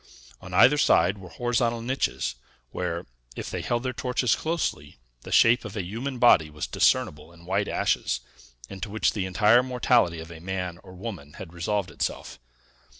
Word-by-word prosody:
On 95 - -10
either 130 +11 +6
side 100 -7 +3
were 90 -2 -11
horizontal 120 +5 0
niches, 120 - -1 0.4
where, 85 -1 -3 0.3
if - - -6
they - - -3
held 120 0 -1
their 130 -1 -2
torches 125 -1 +1
closely, 155 - -3 0.2
the - - -10
shape 120 +2 +5
of 110 -2 -8
a 100 - -1
human 120 +9 -5
body 95 -11 +5
was 75 0 -5
discernible 75 +2 +1
in 85 0 -17
white 100 +3 0
ashes, - - 0 0.5
into 95 - -7
which 110 +2 +1
the 95 -3 -2
entire 105 +6 +5
mortality 125 -8 +2
of 80 +1 -9
a 80 - -10
man 90 -1 -4
or 95 - -13
woman 90 -7 -8
had 85 -1 -10
resolved 95 +3 -2
itself. - - -4
100 Hz, 170 wpm, -26 LUFS, 85-120 Hz, 0.5 s, either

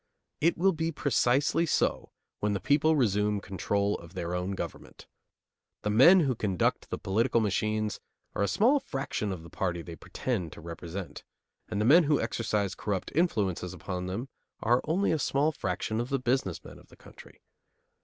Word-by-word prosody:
It 170 +3 +2
will 190 +3 +4
be 165 -1 -2
precisely 140 +3 +2
so - - 0 0.3
when 105 0 0
the 100 - -1
people 150 - +3
resume 105 -5 +2
control 100 +2 -1
of 85 +2 -14
their 85 -1 -3
own 90 +2 -2
government. 95 - -7 0.8
The 105 - 0
men 165 - +7
who 135 -5 +1
conduct 100 -6 -1
the - - -3
political 115 +5 +1
machines 110 0 0 0.3
are - - -2
a 100 - +3
small 235 - +3
fraction 135 - -3
of 90 -4 -6
the 85 - -11
party 90 -4 -2
they 85 -1 -8
pretend 90 - -3
to - - -11
represent, 85 +2 -7 0.5
and 105 - -2
the 105 - +1
men 160 +7 +7
who 145 0 +3
exercise 105 -4 -1
corrupt 100 -3 -3
influences 105 - 0
upon 90 -1 -5
them 105 +8 -4 0.4
are 120 +3 +3
only 180 +6 +1
a 160 - +1
small 145 +3 +1
fraction 110 - -2
of 120 - -5
the 135 - +1
business 125 -7 -1
men - - -12
of - - -19
the - - -19
country. - - -16
105 Hz, 175 wpm, -29 LUFS, 95-140 Hz, 0.8 s, men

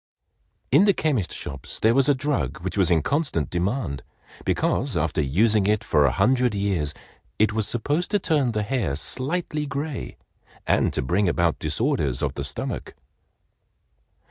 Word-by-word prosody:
In 200 - +6
the 200 -3 +4
chemist 135 - 0
shops 70 -1 -5
there 110 +1 +3
was 135 +2 +3
a 145 - +4
drug 130 - -2
which 95 - -4
was 95 -3 +3
in 80 -4 +3
constant 140 - -1
demand, 90 - -2 0.4
because - - 0
after - - 0
using 100 - +3
it 105 0 +1
for 75 - +3
a - - +2
hundred 125 - +2
years, 95 -8 -1 0.4
it 110 0 +2
was 110 -1 +1
supposed 145 +9 -1
to 210 - +2
turn 150 - +1
the 105 -1 0
hair 105 - -1
slightly 150 - -2
gray 140 -1 -5 0.5
and - - +2
to - - -1
bring 90 +8 +1
about 85 -1 +1
disorders 75 - 0
of - - 0
the - - -4
stomach. - - -4
110 Hz, 160 wpm, -24 LUFS, 85-140 Hz, 0.5 s, In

